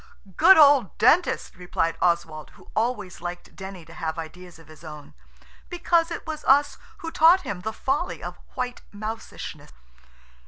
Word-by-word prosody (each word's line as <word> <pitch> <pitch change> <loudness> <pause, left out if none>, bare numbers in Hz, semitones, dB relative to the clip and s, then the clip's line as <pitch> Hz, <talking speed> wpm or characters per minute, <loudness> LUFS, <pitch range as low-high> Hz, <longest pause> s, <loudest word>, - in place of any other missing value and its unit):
"Good 385 - +7
old 280 - +5
Dentist!" 300 - +2
replied 170 -2 -2
Oswald, 165 -3 0
who - - -19
always 220 -6 -2
likes 175 0 -7
Denny 190 -3 -9
to 165 - -14
have 160 0 -4
ideas 170 +2 -9
of 165 - -18
his 155 +1 -16
own, 150 -2 -11 0.6
because 345 -1 +1
it 335 - -6
was 315 -2 -6
us 285 +2 +3 0.3
who 325 - -4
taught 340 +4 +5
him 200 - -6
the 220 +3 -3
folly 275 +9 -2
of - - -7 0.2
white 250 -1 -4
mousishness. 215 +2 -8
205 Hz, 155 wpm, -24 LUFS, -, 0.6 s, Good